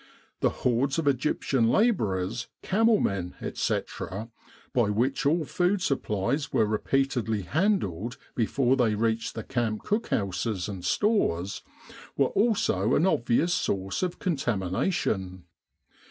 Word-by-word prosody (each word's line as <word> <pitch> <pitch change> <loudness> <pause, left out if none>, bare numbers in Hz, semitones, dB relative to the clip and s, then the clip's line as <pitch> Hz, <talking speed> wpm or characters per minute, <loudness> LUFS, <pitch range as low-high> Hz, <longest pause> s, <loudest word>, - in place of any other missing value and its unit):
The - - +3
hordes 130 +3 0
of 160 -3 -1
Egyptian 135 -3 +1
labourers, 115 - +1 0.2
camel 220 +2 +3
men, 95 -3 -2
etc., 105 +5 -3 0.4
by 120 -6 +2
which 130 +7 +1
all 160 +2 +2
food 180 +6 +1
supplies 135 - -1
were 110 - +3
repeatedly 115 -1 0
handled 120 - 0 0.2
before 125 +2 +2
they 115 -5 +2
reached 115 +1 -1
the 115 - -4
camp 115 -4 -2
cookhouses 105 - -1
and 95 -4 -6
stores, 100 - +1 0.6
were 135 -2 +3
also 225 +1 +2
an 160 - +3
obvious 155 +1 +2
source 95 - -1
of 180 -2 -2
contamination. 95 - -1
120 Hz, 115 wpm, -27 LUFS, 105-165 Hz, 0.6 s, The